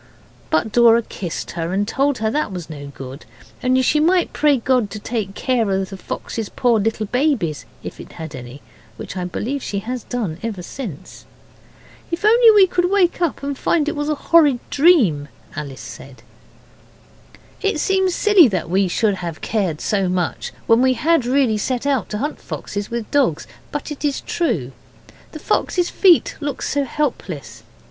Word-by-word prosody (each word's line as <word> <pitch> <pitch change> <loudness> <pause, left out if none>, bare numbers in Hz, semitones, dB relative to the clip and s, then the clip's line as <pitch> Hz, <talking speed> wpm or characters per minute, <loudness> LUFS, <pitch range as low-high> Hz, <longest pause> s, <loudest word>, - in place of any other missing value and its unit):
But 155 +8 +1
Dora 235 0 +5
kissed 180 -5 -6
her, 170 0 -3
and 205 +2 0
told 275 +3 +1
her 220 0 -1
that 300 -4 -1
was 175 -3 -7
no 145 -2 -8
good 135 0 -9 0.4
only 255 +1 +3
she 300 +4 +3
might 350 +3 +2
pray 295 -2 +3
God 245 -3 +1
to 215 - -7
take 210 -2 -4
care 245 -5 0
of 190 0 -1
the - - -5
fox's 215 +3 -5
poor 240 -3 +2
little 220 +1 -1
babies, 240 - 0 0.2
if - - -8
it - - -11
had 160 -2 -8
had 130 - -6
any, 125 +3 -11 0.3
which - - -7
I 180 -1 -3
believe 240 - -3
she 205 - -4
has 240 +5 -4
done 205 -10 -3
ever 215 -6 -4
since. 195 - -8 0.8
'If 340 +4 -3
only 465 +2 +7
we 415 -3 +7
could 355 -1 0
wake 370 -3 +2
up 335 -4 -1
and 280 0 -2
find 300 +2 +1
it 305 - -1
was 295 0 -2
a 305 - +1
horrid 295 -3 +4
dream,' 250 - +4 0.3
Alice 140 -3 -6
said. 135 -1 -11 1.4
It 400 -7 0
seems 380 +1 +1
silly 410 -8 +6
that 185 -6 -3
we 190 +1 +3
should 210 +3 +1
have 170 -3 -5
cared 190 -9 -1
so 195 -3 0
much 180 -2 -2
when 230 +1 +4
we 260 0 +4
had 290 0 +2
really 250 -5 +2
set 250 +4 -2
out 275 -5 0
to 210 - -3
hunt 290 +7 -3
foxes 205 0 -5
with 235 -2 -4
dogs, 265 - +2 0.3
but 290 +1 -4
it 295 - -7
is 285 -2 0
true. 205 - -1 0.6
The - - -7
fox's 355 -1 0
feet 360 -5 +4
looked 290 -3 -4
so 285 0 0
helpless. 245 - -4
235 Hz, 180 wpm, -20 LUFS, 190-290 Hz, 1.4 s, only